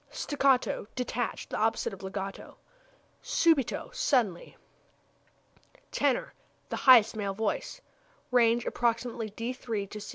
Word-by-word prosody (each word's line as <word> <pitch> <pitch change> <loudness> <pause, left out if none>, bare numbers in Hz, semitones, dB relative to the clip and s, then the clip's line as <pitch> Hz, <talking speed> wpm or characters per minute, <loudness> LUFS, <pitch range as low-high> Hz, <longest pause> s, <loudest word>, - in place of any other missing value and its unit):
Staccato 270 -7 +1
detached; 245 -1 -3
the - - -2
opposite 225 -1 0
of 195 - -10
legato. 195 0 -6 0.7
Subito 320 -6 +1
suddenly. 245 - 0 1.3
Tenor 280 -3 0 0.4
the - - -3
highest 235 -5 +6
male 200 -2 -3
voice. 220 - -3 0.5
Range 235 -1 +3
approximately 230 -1 -1
d 230 +4 -4
c''. 215 -5 -5
230 Hz, 100 wpm, -29 LUFS, 210-255 Hz, 1.3 s, highest